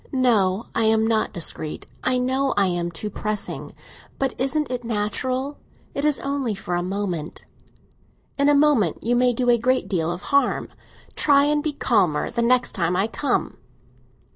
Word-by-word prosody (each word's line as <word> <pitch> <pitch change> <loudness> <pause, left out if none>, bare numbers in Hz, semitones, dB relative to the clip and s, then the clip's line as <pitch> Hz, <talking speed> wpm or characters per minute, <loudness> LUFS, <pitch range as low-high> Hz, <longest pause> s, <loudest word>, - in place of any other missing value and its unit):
"No, 225 -6 +2
I 225 - +1
am 220 0 +3
not 225 -1 +1
discreet; 160 -3 -3 0.2
I 255 0 +2
know 260 +2 0
I 200 - +4
am 175 -2 -1
too 190 +5 -5
pressing. 210 0 -4 0.4
But 270 -2 -1
isn't 275 +2 0
it 245 -1 -3
natural? 255 +5 -2 0.3
It 280 - -2
is 300 -2 +2
only 275 -6 -2
for 180 -2 -5
a 175 - +1
moment." 180 -4 -4 0.9
"In 280 +1 +3
a 290 - +5
moment 280 - +3
you 240 +2 +1
may 250 0 +4
do 245 +1 -1
a 235 - +3
great 255 +3 +1
deal 165 -4 -1
of 175 +1 -6
harm. 280 - +2 0.5
Try 280 -1 +4
and 295 +1 +2
be 310 0 -1
calmer 200 - +1
the 235 - -1
next 250 +1 +2
time 175 -2 0
I 190 +3 +2
come." 275 +5 -2
235 Hz, 170 wpm, -23 LUFS, 195-270 Hz, 0.9 s, a